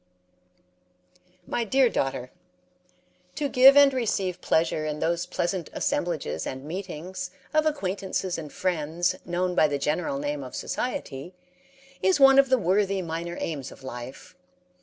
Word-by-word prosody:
My 240 - -1
Dear 260 +4 +3
Daughter: 135 - -2 1.0
To 290 - -1
give 270 +1 +7
and 280 -1 +7
receive 200 -7 -1
pleasure 160 -1 +1
in 150 -1 -3
those 170 +3 -1
pleasant 180 -1 -2
assemblages 170 -4 -2
and 130 0 -6
meetings 180 +1 -5 0.2
of 310 0 +3
acquaintances 190 - -2
and 150 -3 -8
friends 175 0 -1
known 180 +1 -1
by 155 - +4
the 145 -1 -1
general 150 +1 -1
name 145 0 -3
of 130 - -8
society, 180 - -4 0.7
is 190 +5 +3
one 270 0 +8
of 275 -1 +4
the 260 - +5
worthy 195 -1 +1
minor 170 +1 -4
aims 140 -5 -4
of - - -14
life. 130 +8 -9
175 Hz, 140 wpm, -26 LUFS, 150-200 Hz, 1.0 s, one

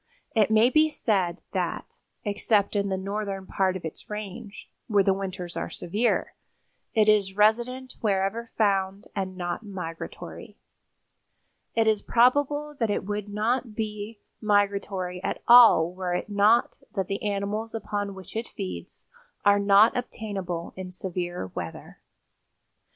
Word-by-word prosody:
It 220 -3 +3
may 220 +3 +5
be 310 +2 +5
said 190 - 0
that, - - -3 0.3
except 205 0 +1
in 200 -1 +1
the 190 - 0
northern 195 0 -4
part 190 -1 0
of 175 - -9
its 160 - -8
range, 210 0 -7 0.2
where 205 -3 +4
the 195 - +3
winters 185 -2 -5
are - - -3
severe, 215 +7 -1 0.6
it 215 -1 +4
is 200 -2 +3
resident 240 +5 +2
wherever 210 +2 0
found 195 -2 +1
and 190 -2 -3
not 175 +1 -3
migratory. 180 -6 -7 1.2
It 225 -1 +3
is 215 -2 +2
probable 290 +5 +2
that 225 -3 +1
it 205 - -1
would 205 0 -3
not 220 +2 -1
be 215 0 -4 0.2
migratory 200 -3 0
at - - -3
all 225 -9 +8
were 180 -1 -2
it 180 - -3
not 210 +3 +3 0.2
that 195 -2 0
the 195 +2 -3
animals 210 +2 -2
upon 205 -2 -3
which 190 +1 -11
it 225 +1 -2
feeds 90 -2 -7 0.4
are 205 0 +6
not 200 +2 +5
obtainable 195 -8 -4
in 185 -1 -6
severe 180 - -4
weather. 85 -2 -7
205 Hz, 140 wpm, -26 LUFS, 190-220 Hz, 1.2 s, all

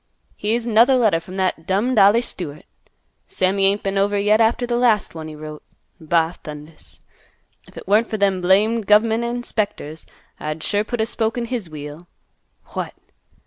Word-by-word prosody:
Here's 225 +3 -1
'nother 235 +3 +5
letter 220 -9 +3
from 180 +3 -11
that 185 -4 -1
dummed 215 +5 +1
Ollie 205 +4 +5
Stewart. 155 -10 -5 0.6
Sammy 195 +1 +1
ain't 200 +1 0
been 195 0 -1
over 205 +1 +1
yet 210 +2 +3
after 235 +2 +2
th' 240 - -8
last 240 -3 +2
one 160 -1 -7
he 155 - -9
wrote. 150 0 -9 0.4
Ba 165 +1 +1
thundas! 150 +1 -10 0.7
If - - -17
it - - -9
weren't 215 +4 +3
for 220 - -2
them 195 -2 +1
blamed 205 +4 +2
gov' 210 +1 +6
ment 225 +1 -1
inspectors, 215 -10 -3 0.3
I'd 155 +1 -5
sure 205 0 +1
put 235 +1 -3
a - - +2
spoke 225 0 -2
in 240 - -2
his 230 -7 -4
wheel. 150 +2 -9 0.7
What! - - -4
200 Hz, 175 wpm, -21 LUFS, 165-225 Hz, 0.7 s, gov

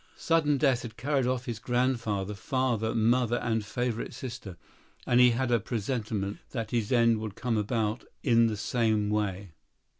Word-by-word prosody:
Sudden 155 -3 +2
death 135 -3 +2
had 115 -1 -9
carried 135 +1 0
off 130 0 -1
his 115 -2 -4
grandfather, 120 -5 0
father, 120 0 -1
mother 120 +1 +2
and 115 -3 -1
favorite 115 +2 -3
sister; 120 -8 -7 0.5
and 120 - +3
he 125 0 +8
had 120 +1 0
a 120 - +4
presentiment 110 -2 -3
that 115 -4 -4
his 115 -4 -1
end 115 -2 +4
would 110 -2 -6
come 125 -2 -1
about 110 +1 -1 0.2
in 115 -3 +4
the 110 -2 -2
same 110 -2 0
way. 100 -3 -2
115 Hz, 160 wpm, -28 LUFS, 105-125 Hz, 0.5 s, he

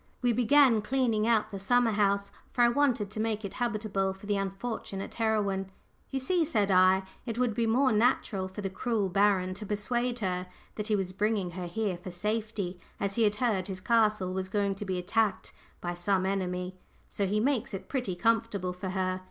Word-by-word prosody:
We 245 -1 +3
began 250 -1 +5
cleaning 230 -2 +1
out 225 -2 +2
the 195 - -5
summer 245 +3 +3
house, 200 -1 +1 0.2
for 245 - +3
I 240 - +6
wanted 240 -6 +1
to 215 - -6
make 220 -1 -1
it 195 - -6
habitable 215 -5 -1
for 195 +2 -13
the 205 0 0
unfortunate 195 0 -4
heroine. 205 -4 0 0.4
"You 270 - -2
see," 340 +6 +1
said 215 -11 +1
I, 185 +1 +5 0.2
"it 230 -1 -3
would 245 -2 +1
be 230 +1 0
more 260 +4 +3
natural 210 -3 +1
for 190 +2 -7
the 195 - -2
cruel 210 -1 -1
baron 190 -1 +2
to 200 +3 -8
persuade 240 +4 -1
her 185 -4 -2 0.3
that 210 -1 -4
he 215 - +2
was 190 -2 -1
bringing 205 -1 0
her 180 0 -5
here 195 0 -2
for 180 +2 -8
safety, 210 -1 -3 0.2
as 200 0 -1
he 230 - 0
had 210 -2 +3
heard 210 -5 0
his 190 -2 -5
castle 215 -3 +2
was 190 0 -3
going 200 0 +1
to 195 +2 -6
be 190 -2 -2
attacked 200 +2 0 0.3
by 175 0 -2
some 185 +2 0
enemy; 185 -1 -2 0.3
so 200 - -2
he 210 +3 +1
makes 250 0 0
it 190 -1 -6
pretty 250 -10 -2
comfortable 215 -3 0
for 185 +1 -5
her. 185 0 -1
205 Hz, 200 wpm, -29 LUFS, 190-225 Hz, 0.4 s, I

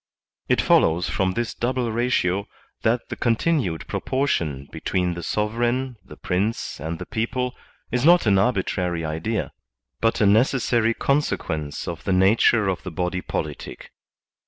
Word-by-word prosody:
It - - +3
follows 85 +2 +3
from 95 -1 0
this 120 +1 -2
double 125 -1 -1
ratio 105 -5 0 0.3
that 120 +2 0
the - - -4
continued 115 - 0
pro - - -2
portion 80 - -1
between 90 -1 -1
the 85 - -6
sovereign, 120 +7 -1
the - - -13
Prince, 100 +6 -2
and 80 +1 -4
the - - -7
people 125 +3 -2 0.4
is 125 0 0
not 175 0 +6
an 100 -3 +4
arbitrary 90 -6 0
idea, 80 +8 -2 0.5
but 115 0 +1
a 105 - +4
necessary 115 +1 +3
consequence 80 - -1
of 85 -1 -5
the 95 - 0
nature 100 +3 +4
of 95 -2 -1
the 95 - -6
body 90 +2 -2
politic. - - -5
105 Hz, 145 wpm, -23 LUFS, 90-120 Hz, 0.5 s, not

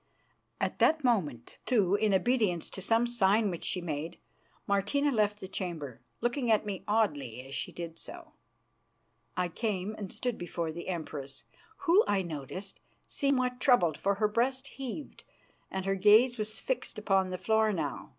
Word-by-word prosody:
At - - -2
that 315 -1 +4
moment, 155 - 0
too, 205 -7 +2
in 210 +1 +3
obedience 195 -4 +1
to 190 - -6
some 225 +4 +3
sign 215 -3 +3
which 170 - -6
she 180 - -2
made, 160 -1 -4 0.5
Martina 205 +9 +1
left 210 -3 +1
the 190 - -6
chamber, 165 - -5 0.2
looking 240 +1 0
at 215 -1 +3
me 200 -3 -4
oddly 145 - 0
as 135 - -10
she - - -3
did 165 -1 -7
so. 340 -2 -10 1.1
I 180 0 +1
came 200 +1 -2
and 205 -3 -6
stood 245 -2 -3
before 170 -2 -3
the 170 +2 -7
Empress, 150 -6 -5 0.4
who, 370 +5 +6
I 195 -2 +2
noted, 160 +2 -5 0.4
seemed 280 -1 +1
somewhat 250 -1 -1
troubled, 245 - +4
for 200 0 0
her 210 +1 +2
breast 255 +5 0
heaved 270 +2 -7 0.5
and 190 0 -3
her 195 - +2
gaze 215 +6 +6
was 215 0 -2
fixed - - -3
upon 195 -3 +2
the 185 - -3
floor 220 +2 +2
now. 155 -7 -3
205 Hz, 165 wpm, -30 LUFS, 175-235 Hz, 1.1 s, who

